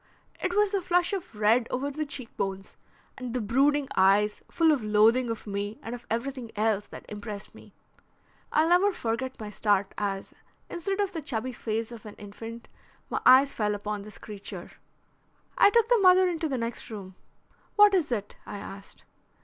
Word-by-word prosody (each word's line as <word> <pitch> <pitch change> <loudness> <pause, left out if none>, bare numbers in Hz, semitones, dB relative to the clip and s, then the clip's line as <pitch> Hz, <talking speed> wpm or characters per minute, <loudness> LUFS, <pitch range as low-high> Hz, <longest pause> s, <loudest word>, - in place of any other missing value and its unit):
It 370 -1 -1
was 415 -1 +3
the 400 -2 0
flush 355 +1 +1
of 370 - -5
red 220 +3 +3
over 275 +3 -2
the 305 +1 -3
cheekbones, 200 -8 -5 0.4
and 250 -1 -5
the - - +1
brooding 275 +6 +2
eyes 200 +2 +3
full 330 -1 +3
of 280 -7 +1
loathing 220 +4 +4
of 225 - -4
me, 205 +1 -4
and 230 - -5
of 245 0 -9
everything 235 0 -3
else, 210 -1 +1
that - - -11
impressed 205 -1 -7
me. - - -16 0.8
I'll 315 +2 +3
never 365 +4 +5
forget 255 -1 -3
my 210 -1 -6
start 205 -1 +1
as, 195 -1 -3 0.4
instead 390 +4 -2
of 400 -2 0
the 325 - -3
chubby 255 -2 -3
face 225 0 -3
of 225 -2 -10
an 210 - -10
infant, 225 +3 -9 0.4
my - - -1
eyes 270 +2 +7
fell 210 -1 0
upon 205 0 -4
this 210 0 -11
creature. 205 -2 -8 0.8
I - - +7
took 460 +1 +3
the 485 -1 +4
mother 370 -1 +6
into 330 -3 -1
the 265 - -1
next 230 0 -4
room. 195 -4 -8 0.6
'What 415 -1 +7
is 345 -8 +1
it?' 210 -3 -3
I - - -7
asked. 195 0 -10
235 Hz, 180 wpm, -28 LUFS, 210-310 Hz, 0.8 s, eyes